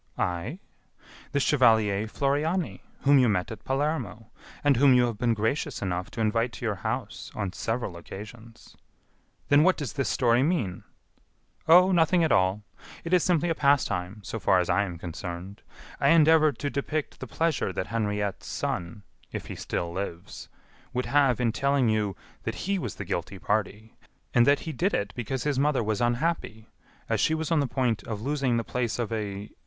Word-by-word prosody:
"I? 90 - -2 0.7
The 145 - +1
chevalier 110 -7 +3
Floriani, 150 +8 -1 0.2
whom 140 0 +5
you 125 -3 +4
met 90 -1 0
at 110 - -8
Palermo, 135 -6 -2 0.3
and 145 -1 +4
whom 135 0 +6
you 125 -1 +5
have 115 -4 -4
been 120 -2 +2
gracious 110 +7 -1
enough 90 0 -3
to 115 - -5
invite 115 +2 +1
to - - -6
your 110 - +1
house 110 0 -4
on 100 -4 -3
several 115 -4 -3
occasions." 110 +6 -11 0.7
"Then 145 +1 +6
what 185 +3 +4
does 145 -6 -4
this 140 -2 -1
story 120 -1 +3
mean?" 130 - -1 0.8
"Oh! 180 +3 +7
nothing 170 0 +3
at 160 - +1
all! 95 +2 +2 0.4
It 170 - -3
is 180 - +5
simply 175 -1 +2
a - - +2
pastime, 105 - +1
so 115 - -5
far 95 - +3
as 90 - 0
I 100 - +2
am 90 -3 -6
concerned. 90 +3 -7 0.4
I - - +3
endeavor 160 -1 +6
to 145 +2 -4
depict 150 +2 -3
the 130 - -6
pleasure 160 -7 0
that 95 - -3
Henriette's 105 -3 -2
son, 85 +4 -4 0.3
if - - -5
he - - -7
still 85 -1 -3
lives, 90 0 -6 0.4
would 125 0 -1
have 140 -4 +3
in 120 -2 +2
telling 140 0 +1
you 105 -3 0 0.3
that - - -4
he 195 0 0
was - - -4
the 100 - -6
guilty 85 +3 -3
party, 105 +2 -2 0.4
and 120 -1 +5
that 140 0 +4
he 160 - -5
did 185 +6 0
it 100 0 -2
because 125 +2 -3
his 145 -3 0
mother 140 -4 +2
was 105 -1 -1
unhappy, 120 -3 -1 0.4
as - - 0
she 160 - +2
was 160 +1 -3
on 165 - +3
the 140 - +1
point 120 -5 0
of 110 -3 -4
losing 135 -3 0
the 115 - -1
place 120 -2 -2
of 115 -2 -2
a.... 105 -1 -4
120 Hz, 185 wpm, -27 LUFS, 105-145 Hz, 0.8 s, Oh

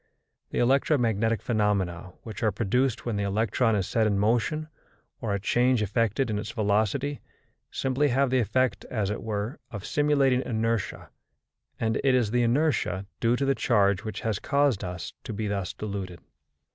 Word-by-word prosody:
The - - -5
electromagnetic 120 -4 +2
phenomena 100 -6 0
which 110 -2 -8
are 110 -2 +2
produced 120 +5 0
when 115 -4 -1
the 100 - 0
electron 110 +3 +1
is 95 -3 0
set 110 -2 +2
in 100 -2 +1
motion 120 +9 +1 0.5
or 105 -4 -1
a - - -2
change 120 +3 +2
effected 115 +4 +1
in 105 - -1
its 105 - -5
velocity, 110 +6 0 0.5
simply 135 +2 0
have 135 0 +2
the 130 - +3
effect, 125 +3 +1
as 105 -4 -2
it 105 - -4
were, 105 +2 -3
of 105 -3 -7
simulating 140 -4 +2
inertia, 115 -3 -2 0.7
and 110 -1 0
it 135 -2 +4
is 120 -5 +1
the 120 +1 +2
inertia 120 - +1
due 115 +1 +2
to 140 - 0
the 135 - +3
charge 100 -6 +2
which 110 - -5
has 110 -3 -1
caused 140 -7 +1
us 90 -2 -5
to - - -5
be 110 +1 -3
thus 100 -2 -2
deluded. 100 -4 -5
110 Hz, 170 wpm, -27 LUFS, 100-130 Hz, 0.7 s, it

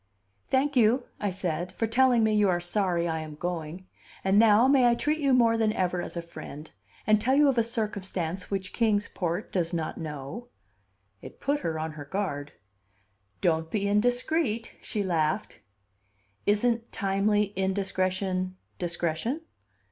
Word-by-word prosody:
"Thank 280 +2 +1
you," 240 +2 +4 0.2
I 205 - 0
said, 180 -2 -3
"for 225 - -1
telling 240 +1 +4
me 220 0 +3
you 210 -2 +4
are 175 -1 +2
sorry 175 -1 0
I 160 -1 -1
am 155 -1 -7
going. 175 +1 -4 0.4
And 195 +2 +4
now, 225 +2 +6
may 265 -3 +5
I 235 - +4
treat 305 +5 0
you 280 -2 +2
more 235 -3 +4
than 220 -1 +2
ever 180 -2 0
as 175 - -6
a 170 - -3
friend, 155 -2 -9 0.3
and 215 -1 +4
tell 260 +4 +2
you 295 +1 +5
of 255 -3 +2
a - - +4
circumstance 195 -6 -3
which 190 -2 -3
Kings 215 -3 +2
Port 175 -2 -3
does 175 -2 0
not 160 -2 -3
know?" 150 - -6 0.7
It - - -11
put 285 +1 0
her 160 - -2
on 160 0 -3
her 150 -1 -9
guard. 145 -5 -3 0.9
"Don't 160 -1 +1
be 200 +2 -1
indiscreet," 245 +3 +1
she 210 -3 -2
laughed. 160 -4 -1 0.9
"Isn't 230 +3 +1
timely 200 +1 +1
indiscretion 185 -1 -1 0.2
discretion?" 175 - -2
195 Hz, 155 wpm, -27 LUFS, 175-230 Hz, 0.9 s, now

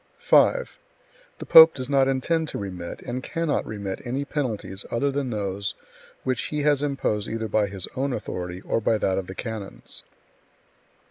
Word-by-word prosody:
5. - - +3 0.6
The - - -7
pope 160 0 +9
does 130 -2 -3
not 135 -1 +3
intend 155 +5 0
to - - -5
remit, 90 -4 -6
and 125 +1 -4
cannot 165 +2 -1
remit 100 -3 -5
any 130 +4 -2
penalties 110 -10 -3
other 140 +4 0
than 140 -1 -2
those 100 -2 -3 0.5
which 130 -1 -1
he 150 -1 -2
has 145 -2 +3
imposed 135 -7 -1
either 115 0 -3
by 105 -1 +2
his 95 -2 -5
own 135 +1 -1
authority 90 -5 -4
or 115 - -1
by 110 +1 +2
that 95 -2 +1
of 95 - -6
the 95 - -7
Canons. 110 -3 -6
120 Hz, 170 wpm, -25 LUFS, 100-140 Hz, 0.6 s, pope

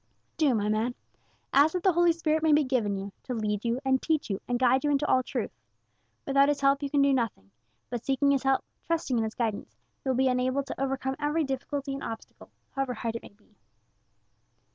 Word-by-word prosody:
"Do, 290 -6 +3
my 210 -1 0
man. 220 +3 0 0.6
Ask 290 +3 +5
that 360 - -2
the 375 - +4
Holy 345 +1 +4
Spirit 315 -1 0
may 315 -1 +3
be 300 +1 +5
given 235 -7 0
you, 195 +1 -6
to 250 - -4
lead 210 -2 -1
you, 235 +1 0
and 265 0 +2
teach 310 -8 0
you, 195 - -2
and 245 - 0
guide 255 +2 +3
you 295 - +1
into 290 0 +2
all 255 - +3
truth. - - -3 0.7
Without 275 +1 +4
His 290 -1 0
help 275 +1 +3
you 285 - -2
can 285 0 +3
do 280 0 +4
nothing; 220 - -2 0.4
but, 240 -1 -3
seeking 275 +1 +2
His 275 -2 +2
help, 270 -1 +1 0.2
trusting 315 -7 -1
in - - +1
his 220 0 -4
guidance, 225 -4 -3 0.3
you 265 - -2
will 260 - +1
be 265 0 +3
enabled 255 +2 +1
to 270 - -6
overcome 265 0 -1
every 300 +2 +1
difficulty 275 +1 -3
and 275 - -5
obstacle, 225 -1 -8 0.2
however 270 -2 -2
hard 230 +1 -3
it - - -11
may - - -12
be." 210 +1 -30
265 Hz, 220 wpm, -28 LUFS, 235-285 Hz, 0.7 s, Ask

